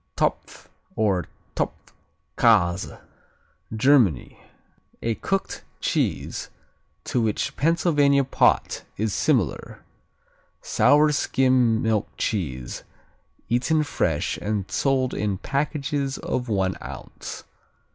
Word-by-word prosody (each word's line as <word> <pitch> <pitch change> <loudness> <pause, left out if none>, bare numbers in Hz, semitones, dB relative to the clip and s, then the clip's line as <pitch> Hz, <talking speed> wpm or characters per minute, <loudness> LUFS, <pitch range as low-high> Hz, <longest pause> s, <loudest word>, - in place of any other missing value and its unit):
Topf - - -2 0.3
or 100 -5 +1 0.3
Topfkäse 90 -6 0 0.8
Germany 110 - +3 0.6
A 115 - +1
cooked 195 - -3 0.2
cheese - - -1 0.5
to 125 - 0
which 110 -2 -1
Pennsylvania 145 -3 +3
pot 135 - +2
is 110 -1 -1
similar. 120 - 0 0.8
Sour 150 +1 +4
skim 130 -5 +2
milk 110 -3 +1
cheese, 65 - -3 0.7
eaten 130 +7 +2
fresh 80 - -1
and 100 -2 -3
sold 130 +2 +1
in 100 -2 -1
packages 140 - -2
of 125 -1 -3
one 95 -3 0
ounce. - - -8
120 Hz, 85 wpm, -24 LUFS, 100-140 Hz, 0.8 s, Sour